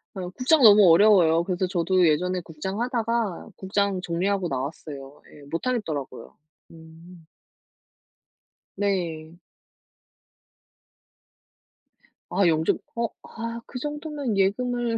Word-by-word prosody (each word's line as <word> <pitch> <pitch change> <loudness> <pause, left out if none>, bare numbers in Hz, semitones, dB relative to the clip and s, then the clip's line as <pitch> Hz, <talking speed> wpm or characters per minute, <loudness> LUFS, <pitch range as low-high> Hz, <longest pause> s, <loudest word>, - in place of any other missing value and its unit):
어 180 -2 -5
국장 265 - +2
너무 205 -4 +8
어려워요. 170 -3 +5
그래서 185 0 -1
저도 180 0 +2
예전에 180 +4 +1
국장 175 +6 -6
하다가 230 -5 -2
국장 195 0 -1
정리하고 180 +2 -1
나왔어요. 140 0 -6
예, 145 - -15
못 165 +9 -4
하겠더라고요. 155 - -4 0.4
음. 165 +1 -15 1.5
네. 170 -5 -2 2.9
아 195 -3 +2
영점 160 0 +2 0.2
어 235 0 0
아 230 0 -6
그 250 - -8
정도면 295 -6 -4
예금을 240 +4 0
185 Hz, 215 characters per minute, -25 LUFS, 165-230 Hz, 2.9 s, 너무